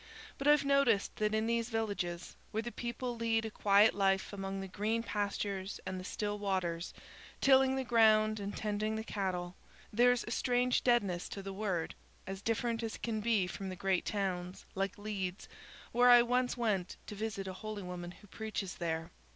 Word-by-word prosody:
But 275 - -1
I've 295 -1 +6
noticed 275 -7 +3
that 215 0 +1
in 220 0 +1
these 230 0 0
villages 200 -6 -3
where 220 +1 -2
the 240 - -5
people 240 +1 -4
lead 225 -1 +1
a 220 - -4
quiet 205 +1 +5
life 195 0 +1
among 195 -1 -4
the 195 - -5
green 215 +5 -1
pastures 200 -2 -2
and 185 0 -3
the - - -7
still 205 +2 -3
waters, 185 -4 -1 0.5
tilling 265 -1 +5
the 265 - -1
ground 215 -3 +4
and 200 0 -5
tending 215 +1 -1
the 220 - -3
cattle, 185 -4 -3 0.4
there's 245 +2 +4
a - - -7
strange 245 +1 +2
deadness 200 -8 +2
to 195 - -6
the 195 0 -5
Word, 190 -5 -2 0.3
as 195 +1 -6
different 230 +1 0
as 225 -1 -4
can 225 -2 -2
be 215 -4 +2
from 190 +2 -5
the 185 - -5
great 190 0 +1
towns, 185 -3 -3
like 195 0 -2
Leeds, 200 -2 -4 0.4
where 245 +1 +5
I 240 -1 +9
once 250 +1 +1
went 205 -7 -1
to - - -7
visit 210 -2 -4
a 190 - -4
holy 215 +1 -6
woman 180 -1 -6
who 185 - -14
preaches 210 -2 -5
there. 165 -1 -3
210 Hz, 185 wpm, -33 LUFS, 190-230 Hz, 0.5 s, I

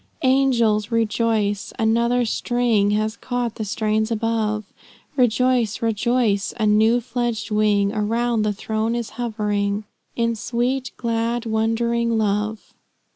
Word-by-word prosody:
"Angels, 240 -6 +3
rejoice! 220 -2 0
another 235 +2 +2
string 230 -3 +1
Has 215 +1 0
caught 245 -2 -3
the 220 - -5
strains 215 +1 0
above, 220 -1 -1 0.5
Rejoice, 245 -2 +2
rejoice! 225 -2 +1
a 215 - +2
new 220 +3 +4
fledged 235 -1 -3
wing 210 -1 +2
Around 230 +2 0
the 210 0 +1
throne 220 +2 -2
is 235 -2 -4
hovering, 210 -3 -1 0.3
In 230 -1 0
sweet, 245 +4 -1
glad, 230 0 -1
wondering 230 +1 0
love." 210 0 -1
225 Hz, 115 wpm, -22 LUFS, 215-235 Hz, 0.5 s, new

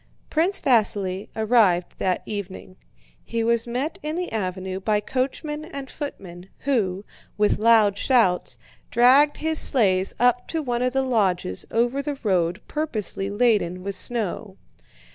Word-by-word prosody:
Prince 340 +5 +1
Vasíli 205 -6 +1
arrived 215 -6 +2
that 185 -1 0
evening. 190 -2 -7 0.5
He 230 -1 -2
was 235 0 +1
met 255 +7 -3
in 305 +1 -4
the 360 +1 -3
avenue 190 -2 -3
by 210 +2 +1
coachmen 275 +7 -3
and 280 -5 -8
footmen, 190 - -8
who, 205 -8 -1 0.3
with 210 0 +2
loud 215 -3 +4
shouts, 225 -9 +2 0.3
dragged 265 +5 +5
his 315 0 -1
sleighs 195 -7 +3
up 245 0 +2
to 320 -2 -3
one 240 -3 -2
of 250 0 0
the 270 0 +1
lodges 190 - -1
over 240 +4 0
the 285 0 -4
road 180 -2 0
purposely 220 -10 -2
laden 200 -5 +1
with 200 +1 -3
snow. 215 -4 -4
225 Hz, 140 wpm, -23 LUFS, 190-265 Hz, 0.5 s, dragged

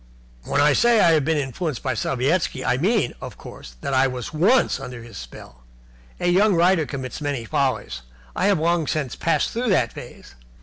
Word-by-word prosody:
"When - - 0
I 145 0 +5
say 235 +7 +4
I 170 - +5
have 155 -4 +2
been 160 0 +1
influenced 145 +1 -3
by 130 - 0
Sovietski, 135 +1 -1
I 125 - +1
mean, 195 - +1
of - - -8
course, - - -12
that 140 - -3
I 130 +1 +4
was 125 +1 -6
once 195 +12 +3
under 125 -2 -8
his 115 -3 -13
spell. 60 -1 -11 0.6
A - - -3
young 195 +3 +4
writer 170 -2 +3
commits 130 0 -6
many 140 -5 -3
follies. 60 - -1 0.3
I - - +1
have 200 -2 +3
long 165 0 +1
since 140 -5 -2
passed 165 - 0
through 240 +1 -2
that 130 - +2
phase. - - -11
150 Hz, 190 wpm, -22 LUFS, 125-175 Hz, 0.6 s, I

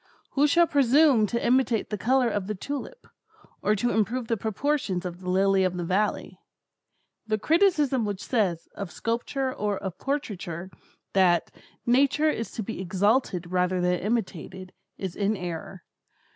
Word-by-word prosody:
Who 290 +1 +3
shall 340 +4 +5
presume 280 -5 +4
to 235 +3 -2
imitate 245 -3 +2
the - - 0
colors 250 +1 +2
of 195 -2 -2
the 215 - -2
tulip, 285 - -6 0.6
or 210 - +2
to 240 +4 0
improve 225 +2 0
the 230 - +2
proportions 220 -3 -1
of 175 0 -5
the 180 -1 -6
lily 195 +1 +3
of 185 -1 0
the 175 - -2
valley? 195 +5 -1 0.9
The 215 0 +1
criticism 300 - +2
which 205 -2 -3
says, 190 -9 0
of 200 -3 -6
sculpture 255 +3 -2
or 205 -3 -1
of 190 -3 -6
portraiture, 190 - -4 0.4
that 180 -3 +3 0.3
"Nature 280 +5 +3
is 230 - -4
to 220 - -4
be 220 -1 -5
exalted 190 -1 0
rather 180 0 +1
than 180 0 +1
imitated," 190 -4 -3 0.2
is 190 -3 -5
in 205 +1 0
error. 175 +1 -6
210 Hz, 155 wpm, -26 LUFS, 185-255 Hz, 0.9 s, shall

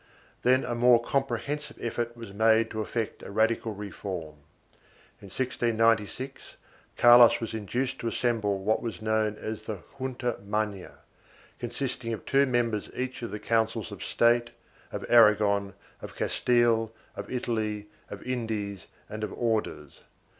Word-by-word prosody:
2 - - +1
Then 130 +1 +4
a 120 - -2
more 120 0 +5
comprehensive 135 +4 -2
effort 120 0 -3
was 115 -4 -9
made 110 +1 +3
to 110 - -2
effect 110 +1 -3
a - - -9
radical 110 +2 +1
reform. 95 -6 -6 0.8
In - - -11
1696, 115 +1 0 0.4
Carlos 120 0 +8
was 115 -1 -5
induced 120 +5 -2
to 120 - -3
assemble 115 -4 0
what 105 +3 0
was 110 -6 -5
known 110 -1 +1
as 110 0 -6
the 100 -6 -5 0.2
Junta 125 -2 -2
Magna, 105 -2 -3 0.7
consisting 120 -1 -3
of 110 - -7
two 140 0 +3
members 115 -4 0
each 130 0 -4
of 115 - -4
the 105 - -5
Councils 115 -2 0
of - - -7
State, 120 0 +3 0.4
of - - -5
Aragon, 105 -4 +4 0.3
of - - -9
Castile, 120 -2 +2 0.2
of - - -7
Italy, 110 -4 -2 0.2
of 100 - -8
Indies 110 -6 -3 0.2
and 110 0 -6
of - - -3
Orders. 115 -3 -2
115 Hz, 140 wpm, -28 LUFS, 105-120 Hz, 0.8 s, Carlos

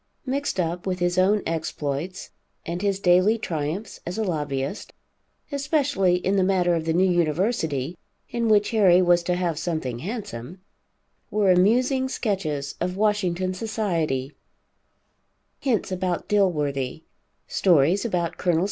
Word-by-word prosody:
Mixed 275 -5 -2
up 175 +1 -2
with 185 -1 -1
his 175 0 +1
own 200 +3 +3
exploits, 160 +1 -3 0.3
and 170 +2 -4
his 200 -1 0
daily 185 +4 +4
triumphs 165 +1 -4
as 175 +3 -5
a 220 - 0
lobbyist, 145 -2 -3 0.6
especially 280 - +1
in 190 +2 0
the 190 - +3
matter 185 -2 +2
of 165 -1 -1
the 165 - +1
new 185 +3 +3
University, 165 - 0 0.4
in 235 -1 0
which 210 -1 +3
Harry 195 -6 +5
was 175 -1 +4
to 175 +1 -1
have 175 -3 -1
something 155 -8 -3
handsome, 190 - -6 0.7
were 205 -3 +3
amusing 250 +8 +3
sketches 155 - -2
of 180 +1 -2
Washington 185 -4 +1
society, 170 - -2 1.3
hints 235 -8 0
about 180 -1 -2
Dilworthy, 150 -8 0 0.4
stories 175 +1 +3
about 175 -7 -1
Col. 175 -3 +1
180 Hz, 130 wpm, -24 LUFS, 165-205 Hz, 1.3 s, Harry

